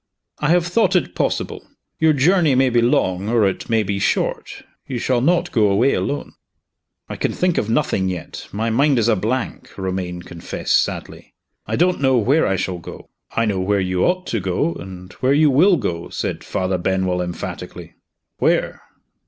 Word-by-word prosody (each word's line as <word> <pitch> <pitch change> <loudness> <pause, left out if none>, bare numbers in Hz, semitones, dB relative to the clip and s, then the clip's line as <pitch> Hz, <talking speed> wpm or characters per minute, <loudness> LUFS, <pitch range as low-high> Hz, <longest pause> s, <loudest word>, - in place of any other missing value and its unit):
"I 150 - 0
have 175 0 +3
thought 200 +6 +2
it - - +1
possible. - - -2 0.4
Your 160 0 +4
journey 155 0 +3
may 130 0 +3
be 120 0 +3
long, 100 -4 +1
or 115 -3 +3
it 95 - -2
may 110 -1 +2
be 100 0 -2
short - - -1 0.2
you 130 - -3
shall 120 0 0
not 175 +5 +2
go 110 -4 +3
away 115 +8 +3
alone." 145 - -3 0.7
"I - - -6
can - - -1
think 180 -2 +1
of 105 - -3
nothing 110 -7 +1
yet; 90 -3 -6
my 110 +3 -1
mind 140 +4 +3
is 115 -1 +2
a 115 - +4
blank," 115 +6 -3
Romayne 90 -2 -4
confessed 85 -1 -1
sadly. - - -7 0.3
"I - - -1
don't 180 -1 +2
know 130 -2 +3
where 135 +8 +3
I 95 - +1
shall 95 -1 -3
go." 85 - -11 0.2
"I 115 - +2
know 100 -3 0
where 100 +2 +1
you 90 -1 0
ought 185 +1 +1
to 115 - -2
go 90 -3 -1
and 90 +1 -10
where 130 +2 +2
you 150 0 +4
will 175 +7 +5
go," 85 - -3
said - - -4
Father 95 -1 -2
Benwell, 95 0 0
emphatically. 90 -1 -6 0.5
"Where?" - - +1
115 Hz, 185 wpm, -20 LUFS, 95-140 Hz, 0.7 s, will